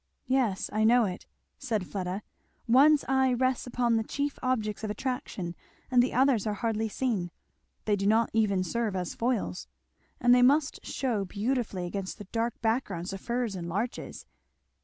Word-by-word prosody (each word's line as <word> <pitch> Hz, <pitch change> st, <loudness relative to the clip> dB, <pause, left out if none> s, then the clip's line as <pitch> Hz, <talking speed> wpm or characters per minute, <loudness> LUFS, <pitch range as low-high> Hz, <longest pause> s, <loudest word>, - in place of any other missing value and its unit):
"Yes, 240 Hz, -6 st, +1 dB
I 215 Hz, +1 st, +2 dB
know 235 Hz, +1 st, +5 dB
it," 185 Hz, -2 st, -5 dB, 0.3 s
said 225 Hz, -8 st, -1 dB
Fleda; 190 Hz, +1 st, -4 dB, 0.4 s
"one's 285 Hz, +5 st, +6 dB
eye 265 Hz, -1 st, +3 dB
rests 255 Hz, 0 st, 0 dB
upon 240 Hz, -2 st, +1 dB
the 225 Hz, -, 0 dB
chief 285 Hz, +5 st, -3 dB
objects 220 Hz, -5 st, -1 dB
of 215 Hz, -, -2 dB
attraction 210 Hz, -6 st, -3 dB, 0.4 s
and 250 Hz, -1 st, +6 dB
the 250 Hz, -, +1 dB
others 250 Hz, -5 st, +3 dB
are 210 Hz, -, -1 dB
hardly 220 Hz, +1 st, -1 dB
seen, 210 Hz, -7 st, -1 dB, 0.6 s
they 210 Hz, -, +3 dB
do 200 Hz, 0 st, -1 dB
not 225 Hz, +2 st, +3 dB
even 205 Hz, -4 st, +2 dB
serve 220 Hz, +1 st, -1 dB
as 180 Hz, -2 st, -3 dB
foils. 220 Hz, -, -2 dB, 0.5 s
And 245 Hz, 0 st, +5 dB
they 250 Hz, -, +6 dB
must 280 Hz, +4 st, +3 dB
shew 230 Hz, -7 st, -1 dB
beautifully 210 Hz, -2 st, -2 dB
against 190 Hz, +1 st, -4 dB
that 205 Hz, -, -11 dB
dark 230 Hz, 0 st, -1 dB
background 200 Hz, -6 st, -1 dB
of 195 Hz, -, -6 dB
firs 235 Hz, -4 st, -2 dB
and 170 Hz, -2 st, -5 dB
larches!" 215 Hz, +8 st, -4 dB
225 Hz, 165 wpm, -29 LUFS, 200-250 Hz, 0.6 s, one's